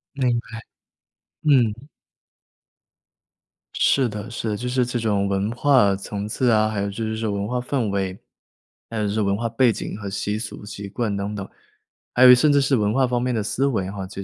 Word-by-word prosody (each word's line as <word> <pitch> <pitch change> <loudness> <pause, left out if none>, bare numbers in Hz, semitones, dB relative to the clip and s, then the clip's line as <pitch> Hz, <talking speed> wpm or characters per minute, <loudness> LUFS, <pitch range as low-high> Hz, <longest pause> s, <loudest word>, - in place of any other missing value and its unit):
明 125 -3 +1
白。 115 -1 -9 0.8
嗯。 130 -3 +2 1.9
是 135 -3 +3
的 105 +1 -6
是 115 -1 -4
的， 105 - -2
就 125 +2 -4
是 125 -1 +1
这 120 0 -3
种 100 -3 0
文 100 +2 -1
化 120 -6 +3
层 100 +1 -5
次 125 +3 0
啊， 110 0 +3
还 105 -2 -2
有 100 - -1
就 110 +3 -5
是 110 0 -2
这 110 - -3
种 105 - -1
文 100 +1 -2
化 125 +1 -1
氛 125 -3 -1
围， 95 -1 -2 0.7
还 115 - -5
有 105 -1 0
就 100 - -2
是 110 - 0
文 100 -1 +1
化 115 +2 -2
背 115 0 +3
景 100 - -6
和 100 -2 -6
习 105 +2 -2
俗、 110 -2 -7
习 100 -1 -7
惯 105 -1 -2
等 100 +1 -3
等， 100 -1 -5 0.7
还 125 - +4
有 125 0 +10
甚 145 +4 +3
至 140 - +4
是 135 0 +2
文 105 0 +1
化 130 0 +3
方 120 -1 0
面 125 0 0
的 110 - 0
思 130 +6 -1
维 105 -9 0
啊， 95 -1 -5
其 100 0 -7
110 Hz, 230 characters per minute, -22 LUFS, 100-125 Hz, 1.9 s, 有